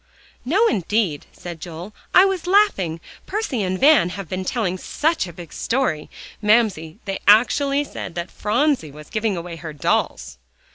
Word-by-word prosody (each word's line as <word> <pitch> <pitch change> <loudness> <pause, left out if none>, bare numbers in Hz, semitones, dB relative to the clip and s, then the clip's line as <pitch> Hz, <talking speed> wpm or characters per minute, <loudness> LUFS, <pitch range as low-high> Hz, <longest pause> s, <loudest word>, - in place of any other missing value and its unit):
"No, 365 - +3
indeed," 195 - 0
said 170 -2 -9
Joel, 175 +5 -8 0.2
"I 370 - +7
was 380 -3 -1
laughing. 360 - +3 0.3
Percy 395 - -2
and 185 -1 -1
Van 285 - +5
have 195 0 -6
been 185 +2 -3
telling 185 -3 -1
such 315 - 0
a - - -8
big 170 -2 -11
story. 230 - -1 0.3
Mamsie, 210 -7 +2
they 195 -2 -3
actually 275 +7 +4
said 180 - -7
that 175 +1 -4
Phronsie 240 - 0
was 150 +1 -13
giving 215 -3 -1
away 170 0 -6
her 160 -2 -7
dolls." - - -1
195 Hz, 155 wpm, -21 LUFS, 170-270 Hz, 0.3 s, I